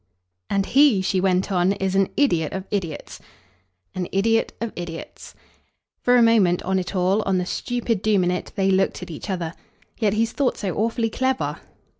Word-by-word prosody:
"And 195 -1 +1
HE," 265 -7 +4
she 185 0 +1
went 190 +1 +1
on, 185 +1 +2
"is 195 -2 -2
an 195 -1 +2
idiot 170 - +2
of 190 - -3
idiots." 175 -7 -4 0.7
"An 180 -1 -3
idiot 225 +4 +2
of 230 -1 -4
idiots." 170 -2 -8 0.7
For 245 - +4
a 240 - +6
moment, 205 -6 +3
on 190 +1 0
it 185 +2 -5
all, 185 +3 +2
on 195 -3 0
the 180 - -1
stupid 235 0 -2
doom 205 -3 +2
in 180 - +1
it, 180 - -4
they 195 -1 +2
looked 190 -1 +1
at 180 - -8
each 160 +6 -8
other. 175 -4 -3 0.5
"Yet 210 -3 +2
he's 225 +1 +1
thought 275 0 0
so 195 -5 -3
awfully 225 +1 0
clever." 260 +2 -1
195 Hz, 185 wpm, -23 LUFS, 180-225 Hz, 0.7 s, a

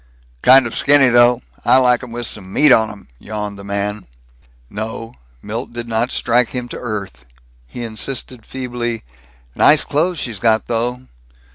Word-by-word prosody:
"Kind 130 0 +7
of 115 - -5
skinny, 140 -2 +4
though. 120 0 +4 0.2
I - - +5
like 125 -2 +3
'em 125 -2 -9
with 120 +1 -4
some 95 -3 -7
meat 150 +6 +4
on 110 -3 +5
'em," 105 -2 -12
yawned 105 -1 -6
the - - -9
man. 100 +1 -3 0.6
No, 115 - -6 0.3
Milt 115 +3 -5
did 120 0 -6
not 115 +2 -1
strike 120 0 +2
him 125 -1 -5
to - - -7
earth. 100 - -6 0.4
He 120 - -7
insisted 115 +1 -4
feebly, 120 -2 -4 0.5
"Nice 150 - +5
clothes 165 +5 0
she's 115 -8 -4
got, 110 0 +2
though." 120 +2 -2
120 Hz, 160 wpm, -18 LUFS, 110-125 Hz, 0.6 s, Kind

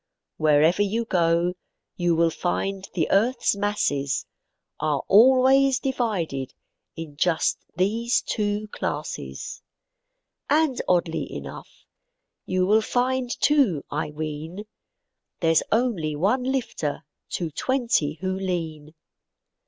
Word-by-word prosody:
Wherever 155 +4 +4
you 220 +3 0
go, 170 -2 +2 0.4
you 175 -1 +1
will 165 0 +3
find 195 +3 -2
the 165 -4 +1
earth's 235 +3 +2
masses, 145 -10 -1 0.5
Are 150 -3 0
always 260 +4 +6
divided 190 - -2 0.4
in 160 -3 -8
just 165 +1 +1
these 225 +7 +1
two 210 -1 -2
classes. - - -5 0.9
And 295 -3 +2
oddly 175 -2 0
enough, - - -9 0.6
you 185 0 +1
will 215 +3 +4
find 250 +2 0
too, 265 - +3
I 150 +1 -2
ween, 155 +6 -6 0.7
There's 165 -2 +3
only 205 -10 0
one 215 - +1
lifter 240 - -2 0.3
to 170 -3 -2
twenty 235 - 0
who 185 0 -1
lean. 165 -5 -4
185 Hz, 105 wpm, -24 LUFS, 160-235 Hz, 0.9 s, always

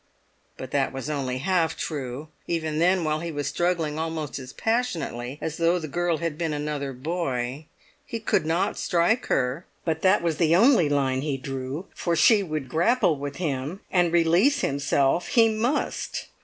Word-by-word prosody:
But 130 0 -8
that 140 -2 +1
was 135 +3 -5
only 130 -4 -2
half 165 +3 +1
true, 140 0 -5 0.2
even 160 -2 -1
then 180 +1 +3
while 155 -1 0
he 170 +1 -4
was 145 -2 -3
struggling 160 0 0
almost 160 -3 -3
as 130 -1 -9
passionately 165 - -2
as 160 -1 -4
though 170 +1 +3
the 160 -3 -4
girl 175 +2 0
had 165 -1 -3
been 165 -3 -1
another 145 -2 -3
boy. 135 -1 -3 0.4
He 230 - -5
could 220 - +1
not 165 +3 0
strike 180 +8 +1
her; 130 +6 0 0.2
but 160 -2 -1
that 190 -1 +4
was 165 -3 0
the 165 0 +3
only 220 - +5
line 135 -2 +1
he 140 -2 -2
drew, 135 +5 -5
for 170 -1 -1
she 205 +6 +5
would 155 -7 -4
grapple 175 - +2
with 140 0 -5
him, 150 +2 -3
and 175 -2 +3
release 175 - +3
himself 140 - +1
he 225 -2 +4
must. 230 +6 -2
160 Hz, 170 wpm, -25 LUFS, 140-175 Hz, 0.4 s, only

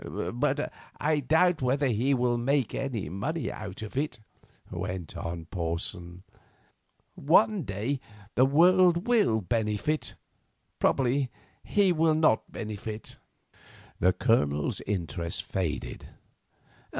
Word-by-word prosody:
"But - - 0 0.3
I 150 0 +2
doubt 160 +4 +3
whether 135 +3 +1
he 130 +3 +2
will 125 -1 +1
make 135 0 +1
any 130 - -3
money 130 - -3
out 105 0 -7
of 110 - -8
it," 135 -3 -1 0.5
went 90 -4 -5
on 85 0 -5
Porson. 85 +1 -4 0.9
"One 205 +7 +3
day 115 - -2 0.3
the 130 +2 +4
world 175 +4 +5
will 210 - +3
benefit; 110 - -1 0.6
probably 135 0 +2 0.3
he 200 -3 +3
will 160 -1 +3
not 155 -8 +2
benefit." 110 0 -6 0.8
The 90 - +4
Colonel's 80 - +1
interest 90 -2 -3
faded. 95 -5 -3
120 Hz, 105 wpm, -28 LUFS, 95-150 Hz, 0.9 s, world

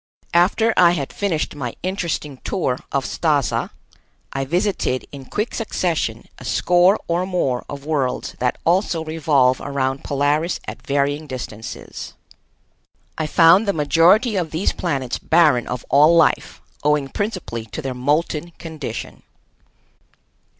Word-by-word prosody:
After 200 +6 +3
I 175 -1 +6
had 140 -6 -3
finished 180 -7 -1
my 130 -5 -5
interesting 170 -7 -3
tour 130 -10 -1
of 140 -1 0
Stazza 150 -6 0 0.6
I 135 0 -2
visited 175 -4 0
in 140 -2 -9
quick 210 - -3
succession 165 - -2
a - - -11
score 180 - +3
or 175 +2 0
more 135 -10 0
of 140 -1 -7
worlds 145 -5 -1
that 125 0 0
also 170 -1 +1
revolve 145 -5 +2
around 135 -1 -2
Polaris 145 +4 0
at - - -7
varying 145 +2 -1
distances. 115 -4 -7 1.0
I 155 - -2
found 170 +7 +5
the 200 - +2
majority 170 - +4
of 170 -3 -1
these 160 +5 -1
planets 135 -8 -2
barren 155 -7 +3
of 125 -1 -5
all 150 +5 +6
life, 165 - +2 0.2
owing 150 -1 +2
principally 180 - -4
to 115 - -7
their 135 -1 -3
molten 150 +5 0
condition. 155 -8 -7
155 Hz, 130 wpm, -21 LUFS, 135-175 Hz, 1.0 s, I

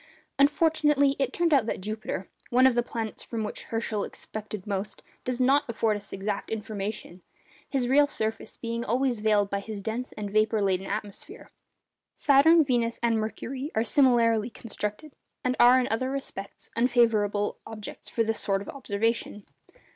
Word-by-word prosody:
Unfortunately, 295 -1 +3
it 270 -2 +1
turned 340 0 +1
out 260 -6 +4
that - - -2
Jupiter, 215 -1 -4 0.2
one 255 +2 +5
of 260 - +6
the 240 - +2
planets 225 -2 -5
from 225 -2 -4
which 210 - -5
Herschel 225 -2 -2
expected 215 -2 -7
most, 200 0 -4 0.2
does 250 0 -2
not 270 +3 +4
afford 225 -2 +1
us 205 -1 -9
exact 200 +1 -3
information 210 -4 -5 0.5
his 260 -3 0
real 285 +3 +5
surface 220 -5 -4
being 230 0 -3
always 245 0 0
veiled 210 -2 +2
by 200 - 0
his 210 +1 -6
dense 225 +5 -4
and 205 -1 -5
vapour 215 +1 +2
laden 190 0 0
atmosphere. 205 -1 -6 0.6
Saturn, 315 +4 +6
Venus, 240 -4 0
and 230 -2 +2
Mercury 255 +6 -4
are 220 - +2
similarly 230 -3 +3
circumstanced, 230 +5 -6 0.3
and 255 0 +1
are 245 +2 +7
in 250 - 0
other 255 +4 0
respects 265 -7 -6
unfavourable 225 -4 +2
objects 215 -2 -8
for 230 - +1
this 225 0 -1
sort 195 0 0
of - - -10
observation. 225 -4 -2
225 Hz, 160 wpm, -27 LUFS, 210-255 Hz, 0.6 s, are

